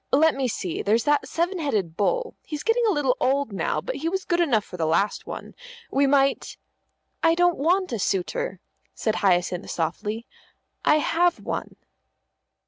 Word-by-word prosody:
Let 315 +3 +5
me 270 -2 -1
see, 185 -7 -3
there's 225 +3 +2
that 295 0 +2
seven 350 +3 -1
headed 205 - -1
bull; 475 - 0
he's 300 -2 -6
getting 460 +1 +2
a - - +4
little 290 -7 +1
old 275 -3 +1
now, 195 - -1
but - - -4
he 320 +3 -1
was 380 +1 -3
good 345 -1 +1
enough 245 -12 +2
for - - -10
the 165 -3 -1
last 170 +6 0
one. - - -7 0.4
We 275 +1 +3
might 275 0 +2 0.3
" - - -45 0.3
"I 330 0 +5
don't 350 -2 +2
want 360 +6 +2
a 230 - -2
suitor," 200 - -1 0.4
said 220 -1 -1
Hyacinth 180 -2 +1
softly. 210 +8 -3 0.6
"I - - +5
have 340 +3 +2
one." - - -4
280 Hz, 175 wpm, -25 LUFS, 210-345 Hz, 0.6 s, Let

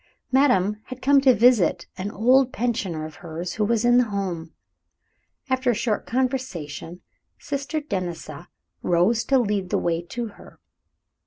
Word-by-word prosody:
Madame 210 -7 +3
had 255 0 -8
come 275 +1 +4
to 265 -1 +6
visit 200 -7 +4
an 190 +2 -4
old 255 +5 +3
pensioner 200 -9 -2
of 155 - -10
hers 170 +1 -6
who 215 - -1
was 230 +2 +1
in 240 0 +5
the 250 - +3
home. 185 -6 -4 1.0
After 260 -1 0
a 240 - +3
short 230 -1 -1
conversation, 230 - -3 0.4
Sister 285 +2 -3
Denisa 180 - -5 0.3
rose 180 +7 +2
to 270 - +3
lead 205 -6 0
the - - +1
way 170 -1 0
to 235 +8 -5
her. - - -16
215 Hz, 150 wpm, -24 LUFS, 175-255 Hz, 1.0 s, to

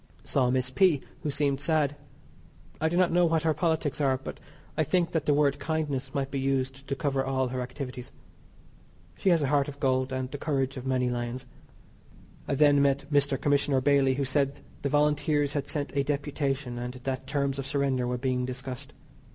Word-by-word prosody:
Saw 130 -3 +1
Miss 130 0 0
P. 160 +1 +4 0.2
who 150 - -2
seemed 140 -1 0
sad. 150 -3 +1 0.9
I 160 - +3
do 175 - -1
not 180 -1 +4
know 175 0 +4
what 165 -1 +1
her 160 -1 +3
politics 155 -2 0
are, 135 -2 +3
but 135 - -8 0.4
I 155 - +2
think 170 +3 +1
that 160 -3 -1
the 145 - +5
word 145 -1 +2
"kindness" 145 -3 -2
might 135 -1 -1
be 140 - -1
used 135 0 -1
to 140 - -1
cover 135 -3 0
all 130 -1 0
her 125 0 -3
activities. 125 0 -6 1.0
She 190 - +1
has 165 -4 +4
a - - +1
heart 140 -1 +2
of 145 -1 -8
gold, 130 -1 +1
and 130 0 -3
the 145 - -5
courage 135 -3 -1
of 130 0 -6
many 125 -1 +1
lions. 120 +1 -3 1.0
I - - 0
then 145 0 +5
met 140 0 +2
Mr. 140 -1 +3
Commissioner 145 -1 +2
Bailey 135 -1 +3
who 140 0 -1
said 140 +1 0 0.2
the 140 - -1
Volunteers 150 0 +2
had 140 -2 -2
sent 145 -2 -3
a 140 - +3
deputation, 140 -3 -2
and 125 +1 -5
that 130 +1 -4
terms 140 -1 -1
of 135 - -4
surrender 140 -3 0
were 125 0 -1
being 125 0 0
discussed. 130 +1 -5
140 Hz, 195 wpm, -28 LUFS, 130-145 Hz, 1.0 s, the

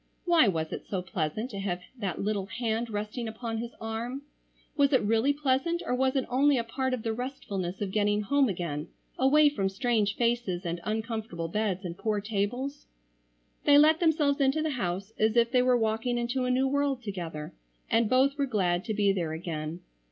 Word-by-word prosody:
Why 340 - +5
was 160 -4 -1
it - - -7
so 190 -3 -2
pleasant 185 - -3
to 200 - -5
have 185 -3 -2 0.2
that 195 -6 -3
little 200 -1 -1
hand 230 +1 -2
resting 215 +3 -4
upon 225 0 -4
his 235 +1 -6
arm? 230 +5 -4 0.5
Was 285 -1 +3
it 260 - +4
really 225 +6 +3
pleasant 285 +4 0
or - - -1
was 260 +1 +1
it 265 - +1
only 275 +2 +3
a 235 - 0
part 260 +3 -1
of 230 - -9
the 225 - -1
restfulness 205 -7 -4
of 200 -2 -2
getting 205 0 +2
home 275 +4 +3
again 170 -5 -3 0.3
away 295 +3 +6
from 200 -10 0
strange 215 -1 0
faces 230 -7 0
and 170 0 -3
uncomfortable 220 -6 -3
beds, 200 -1 -1
and 170 -1 -6
poor 215 -2 0
tables? 225 +7 -3 0.8
They 285 0 +7
let 310 +2 +6
themselves 300 -4 +2
into 275 +3 +2
the 315 - 0
house 195 -4 -3
as 220 +1 +2
if 235 0 +4
they 250 -1 +4
were 250 0 +4
walking 225 +2 0
into 245 +2 -1
a - - 0
new 260 +2 +2
world 280 -2 0
together 170 -7 -5 0.3
and 225 -1 +2
both 275 +3 +3
were 280 - +2
glad 185 -6 +1
to 220 -2 -2
be 200 -1 +3
there 170 -5 -2
again. 160 0 -5
225 Hz, 195 wpm, -28 LUFS, 195-260 Hz, 0.8 s, They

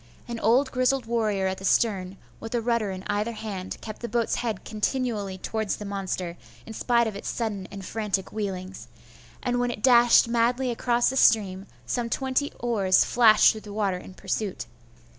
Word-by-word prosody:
An 235 -1 -5
old 250 +6 +3
grizzled 255 0 +1
warrior 215 -4 0
at 190 0 -2
the - - -11
stern, 195 -2 +1 0.2
with 225 +2 -5
a - - +2
rudder 230 -2 0
in 185 0 -6
either 210 +3 -1
hand, 200 -4 -6
kept 215 -1 -8
the 235 - -4
boat's 235 +1 0
head 225 -5 -3
continually 215 -3 -2
towards 220 +2 -2
the 210 - -8
monster, 190 -3 -4 0.3
in 225 - -8
spite 235 +1 +2
of 220 -2 -4
its 200 - -5
sudden 210 -5 -3
and 195 -1 -8
frantic 200 -3 -2
wheelings; 190 - -5 0.6
and 245 -1 0
when 245 0 +1
it 225 -3 -6
dashed 240 -2 +6
madly 240 +2 +1
across 240 +1 +1
the 265 - -3
stream, 195 -5 +3 0.2
some 240 -1 -2
twenty 265 +3 -1
oars 205 -6 +3
flashed 225 -3 +6
through 220 - -8
the 205 -1 -10
water 200 -4 -1
in 185 - -12
pursuit. 195 +1 -3
220 Hz, 180 wpm, -26 LUFS, 195-240 Hz, 0.6 s, dashed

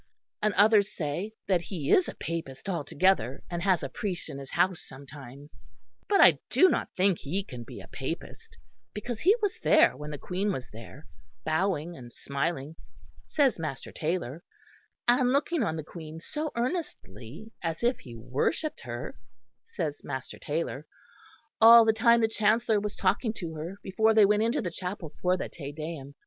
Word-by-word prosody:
And 215 0 +1
others 205 0 +5
say 170 +8 -3
that 185 -3 +2
he 170 -6 -4
is 365 - +5
a - - -8
Papist 160 -3 -5
altogether, 180 -4 +1
and 175 0 -2
has 185 -3 +2
a - - -1
priest 180 +5 -4
in 140 -2 -6
his 135 -1 -9
house 180 0 +1
sometimes. 140 +1 -12 0.5
But 400 -1 +4
I - - +7
do 370 - +6
not - - -1
think 185 -1 +3
he 185 +8 -2
can 125 -10 -8
be - - -10
a - - -12
Papist, - - -7 0.4
because 225 +2 -4
he 390 +6 +5
was 405 - 0
there - - +5
when 150 0 -7
the 150 - -5
Queen 190 +7 -2
was 130 -9 -5
there, 115 +7 -11 0.4
bowing 170 0 0
and 120 -4 -11
smiling, 140 +3 -3 0.5
says 275 - +2
Master 155 -4 -5
Taylor; 160 -2 -3 0.7
and 245 +1 +4
looking 290 +3 +1
on 180 -8 0
the 155 - -4
Queen 160 0 -9
so 300 - -4
earnestly, 220 - -5
as 165 +4 -3
if 240 +2 +2
he 120 -2 -11
worshipped 130 - -2
her, 120 0 -7 0.4
says 150 -5 -5
Master 130 -1 -6
Taylor, 150 -1 -3 0.7
all 230 +1 +10
the 220 - +4
time 235 +1 +4
the 225 - +4
Chancellor 220 0 +2
was 210 0 -4
talking 215 +4 +1
to 170 -6 -6
her 165 +5 -6
before 220 +3 +2
they 215 -2 +8
went 210 +1 +3
into 230 +3 +1
the 175 - -3
chapel 180 -3 -6
for 180 0 +2
the - - -4
Te 145 -4 -8
Deum. 150 -2 -7
175 Hz, 175 wpm, -28 LUFS, 145-220 Hz, 0.7 s, all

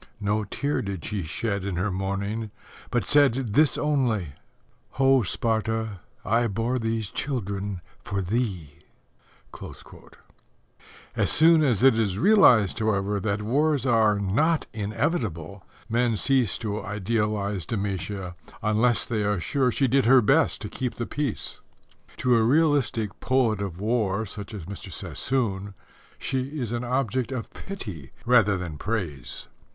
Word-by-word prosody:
No 105 0 0
tear 140 +8 -2
did 100 -4 -5
she 105 -3 -2
shed 100 +5 -3
in 100 -2 -3
her 95 +4 -1
mourning, 100 +4 -3 0.4
but - - 0
said 135 -6 +3
this 150 +4 +4
only: 125 - 0 0.6
"Ho, 135 0 +4
Sparta, 110 0 -1 0.3
I 115 +3 +2
bore 115 +5 -1
these 115 -3 -2
children 100 -8 -3 0.2
for 100 - -4
thee." 95 - -2 2.4
As - - +1
soon 160 +1 +6
as 125 -6 +2
it 130 -4 +6
is 100 -4 0
realized, 125 - +5
however, 100 -2 0
that 100 +1 -2
wars 145 +4 +1
are 110 -4 +3
not 130 - +1
inevitable, 105 - -2 0.2
men 120 0 +1
cease 130 -3 +2
to 105 -1 -3
idealize 105 -3 -1
Demætia, 95 -3 -3 0.3
unless 115 +3 +2
they 110 -3 -1
are 105 -1 0
sure 130 +7 +1
she 135 +3 +1
did 135 -1 +2
her 130 -1 +7
best 140 +8 +3
to 105 - -4
keep 125 +4 -4
the 120 - -3
peace. 145 -4 -3 0.6
To 125 -1 +3
a 115 - +4
realistic 130 -5 +2
poet 120 -6 +1
of 95 -3 -5
war 110 -1 0
such 105 +1 -7
as 95 -6 -7
Mr. 100 +2 -8
Sassoon, 100 -7 -2 0.4
she 135 +3 -3
is 120 -4 -3
an 120 0 -2
object 130 0 -1
of 125 -3 -5
pity 100 - -7 0.2
rather 115 -5 +4
than 85 -5 -6
praise. 90 - -4
110 Hz, 135 wpm, -25 LUFS, 100-125 Hz, 2.4 s, her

